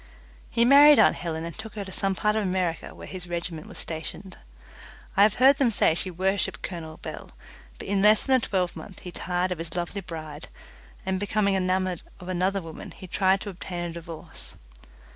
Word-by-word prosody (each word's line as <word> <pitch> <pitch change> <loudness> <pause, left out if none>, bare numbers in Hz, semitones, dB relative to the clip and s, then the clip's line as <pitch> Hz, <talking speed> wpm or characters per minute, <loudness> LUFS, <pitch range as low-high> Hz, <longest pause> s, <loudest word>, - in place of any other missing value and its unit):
He 235 0 +3
married 285 +3 +9
aunt - - +6
Helen 165 -1 -3
and 170 - -6
took 220 0 -8
her 205 -2 -4
to 190 - -9
some 195 0 0
part 210 +2 +1
of 220 - +2
America 180 -4 -1
where - - -9
his 180 -2 -7
regiment 170 -2 -4
was - - -11
stationed. 170 +4 -6 0.8
I 195 - +4
have 210 0 +6
heard 270 +2 +6
them 270 -4 +3
say 205 - +3
she 180 +3 +1
worshipped 190 +3 -1
Colonel 165 -3 -6
Bell, - - -8 0.5
but - - -8
in 195 0 +1
less 210 +1 +6
than 265 -1 +4
a - - +1
twelvemonth 190 -2 -3
he 180 - -7
tired 180 +1 -1
of 180 - -3
his 165 -1 -5
lovely 175 +3 -3
bride, 155 -4 -8 0.6
and 190 0 0
becoming 205 0 +1
enamoured 185 -1 0 0.2
of 180 -1 -9
another 185 +1 0
woman, 160 -1 -8
he 190 - -9
tried 190 +1 +2
to 205 - -5
obtain 175 -1 -5
a 170 -1 -4
divorce. 165 -1 -7
185 Hz, 200 wpm, -26 LUFS, 170-200 Hz, 0.8 s, married